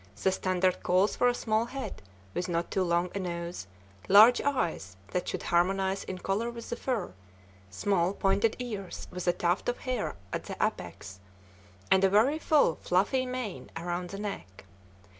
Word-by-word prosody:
The 190 - +4
standard 185 -1 +1
calls 185 +3 +2
for 245 - +3
a 245 - +2
small 220 -1 0
head, 270 +3 -6 0.3
with 180 - -2
not 170 0 -1
too 190 - +1
long 175 0 +1
a 200 - -2
nose, 170 - -4 0.4
large 215 +5 +8
eyes 170 - -1
that 180 - -2
should - - -3
harmonize 190 +2 +1
in 185 - -5
color 200 +5 -1
with 235 -1 -8
the - - 0
fur, 235 - -2 0.6
small, 175 - +1
pointed 200 +3 +2
ears 210 -7 -6
with 180 0 -5
a - - +6
tuft 175 +4 0
of 245 - -1
hair 250 -4 -3 0.2
at - - -3
the - - -6
apex, 95 -1 -3 0.7
and 190 0 +5
a 195 - +6
very 235 +10 +3
full, 295 - +3
fluffy 210 +9 +1
mane 250 -6 -5
around 175 +1 -3
the 195 - -6
neck. 145 - -6
195 Hz, 170 wpm, -29 LUFS, 175-230 Hz, 0.7 s, large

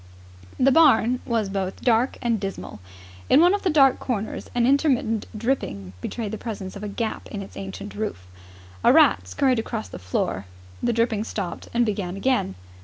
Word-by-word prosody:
The 270 +1 +5
barn 255 -6 +5
was 230 -4 0
both 195 -1 -4
dark 240 +1 +2
and 230 -2 +1
dismal. 195 - -6 0.5
In - - +6
one 350 +3 +6
of 405 - 0
the 375 - +1
dark 275 -5 +5
corners 220 -4 -4
an 240 -1 +3
intermittent 260 -5 +2
dripping 100 - -2
betrayed 220 -4 -4
the 220 - -5
presence 200 -5 -6
of 200 - -8
a 210 - -4
gap 220 +2 -4
in 200 -1 -5
its 195 - -13
ancient 195 +1 -7
roof. 205 - -4 0.6
A - - +6
rat 90 +2 +5
scurried 250 - +1
across 225 -1 -4
the - - -8
floor. 90 +1 -2 0.3
The 240 - +1
dripping 230 -2 +1
stopped 200 -5 -5
and 240 0 +2
began 195 -4 -3
again. 225 - 0
220 Hz, 180 wpm, -24 LUFS, 195-250 Hz, 0.6 s, In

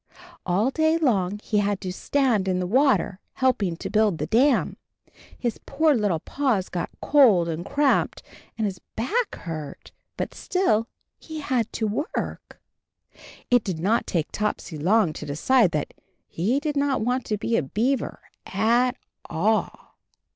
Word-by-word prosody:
All 200 +8 +2
day 315 +2 +2
long 205 - +1
he 210 - +1
had 205 -1 0
to 185 -2 -4
stand 240 -4 +1
in 185 -1 +1
the 180 - -1
water, 250 -3 +2
helping 215 -10 +1
to - - -5
build 210 -5 +3
the - - -2
dam. 260 +5 +2 0.6
His 240 -3 -3
poor 310 +2 +3
little 205 - +1
paws 250 -10 -1
got 175 - -3
cold 225 - +5
and 165 0 -3
cramped, 285 +5 +1 0.3
and 220 - 0
his 190 -3 -3 0.2
back 415 - -1
hurt, 155 -4 -7 0.3
but - - -3
still 230 - +1 0.3
he 315 -1 -7
had 255 -6 -1
to 220 - -1 0.3
work. - - -5 0.9
It 245 -3 +5
did 185 -5 -3
not 205 +8 +1
take 165 -4 -1
Topsy 210 -5 -3
long 185 +1 +3
to 150 - -7
decide 200 - +3
that 150 -1 -2 0.3
he 220 +11 0
did 300 0 -3
not 280 -3 +1
want 250 +3 0
to 210 - -1
be 230 +3 -1
a - - +3
beaver 230 - -1 0.3
at 235 +5 +2 0.3
all. 210 +7 -1
220 Hz, 155 wpm, -24 LUFS, 185-265 Hz, 0.9 s, cold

